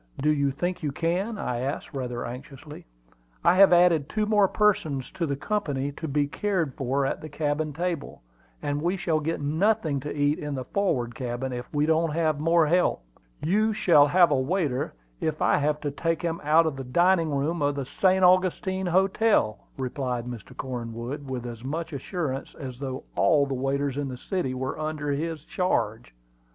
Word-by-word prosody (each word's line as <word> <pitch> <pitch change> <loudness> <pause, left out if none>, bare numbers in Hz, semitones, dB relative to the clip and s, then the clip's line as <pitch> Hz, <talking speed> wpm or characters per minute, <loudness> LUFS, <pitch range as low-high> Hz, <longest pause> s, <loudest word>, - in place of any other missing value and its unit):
"Do 150 +2 +3
you 140 -2 +2
think 175 +7 -3
you 150 -3 -1
can?" 180 +9 -1
I 125 -10 -2
asked, 135 +5 -4
rather 125 -3 -3
anxiously. 135 - -9 0.6
"I 170 +1 +6
have 195 -1 +8
added 175 -4 +4
two 215 -1 0
more 210 -2 +4
persons 160 -11 +1
to 170 - -2
the 140 - -1
company 145 -5 -2
to 160 +3 -6
be 145 0 +1
cared 170 -2 -1
for 135 +2 0
at - - -2
the 155 - -7
cabin 150 +1 -1
table, 170 - -4 0.4
and 145 0 -1
we 175 +4 0
shall 165 -4 0
get 160 +1 -2
nothing 160 0 +1
to 145 +3 -5
eat 145 +1 +1
in 150 -1 -4
the 130 - -3
forward 135 -13 0
cabin 125 +1 -4
if 125 0 -6
we 150 0 +1
don't 160 0 +2
have 155 -2 +1
more 165 +1 +4
help." 175 - +2 0.4
"You 215 +6 +2
shall 150 -8 +5
have 175 +1 +5
a - - +4
waiter 145 - -1 0.2
if 155 -1 -2
I - - +3
have 150 +1 0
to 145 - -2
take 165 +4 -1
him 165 -1 -2
out 155 +3 +5
of 155 -4 -2
the 135 - -4
dining 170 +5 +3
room 150 +3 -1
of 145 0 +1
the 140 -2 -3
St. 190 +6 +2
Augustine 185 +1 +3
Hotel," 190 - +2 0.2
replied 125 -2 -3
Mr. 120 -4 -9
Cornwood, 125 +2 -5
with 125 -2 -4
as 115 -1 -7
much 160 +4 -4
assurance 140 -1 -4
as 130 -4 -7
though 130 -2 -5
all 150 -4 +4
the 135 - -3
waiters 135 +1 -1
in 145 -1 -1
the 130 -1 -6
city 135 -3 -2
were 130 +3 -3
under 155 -1 -2
his 155 +1 -3
charge. 110 - -1
150 Hz, 190 wpm, -26 LUFS, 135-170 Hz, 0.6 s, have